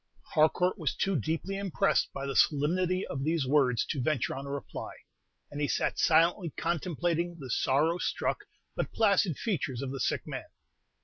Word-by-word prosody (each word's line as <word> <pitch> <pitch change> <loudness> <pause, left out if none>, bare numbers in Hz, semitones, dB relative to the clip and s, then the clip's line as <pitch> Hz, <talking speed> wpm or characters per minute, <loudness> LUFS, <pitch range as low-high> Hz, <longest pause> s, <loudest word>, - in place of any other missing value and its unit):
Harcourt 180 +4 +3
was 155 -5 -1
too 195 -1 0
deeply 165 - -2
impressed 195 -4 +1
by 135 - -5
the 135 -1 -3
solemnity 180 +7 +2
of 135 0 -4
these 160 -1 +1
words 130 -4 +3
to 140 - -2
venture 135 -1 0
on 135 +1 -6
a - - -5
reply, 140 0 -6 0.6
and 145 0 -5
he 145 - +2
sat - - -1
silently 170 +2 +3
contemplating 170 +1 -1
the 135 -5 -7
sorrow 155 +9 +2
struck - - -1 0.4
but - - -2
placid 200 - +3
features 140 - -2
of 130 - -4
the 135 - -5
sick - - 0
man. - - -6
155 Hz, 170 wpm, -30 LUFS, 140-175 Hz, 0.6 s, Harcourt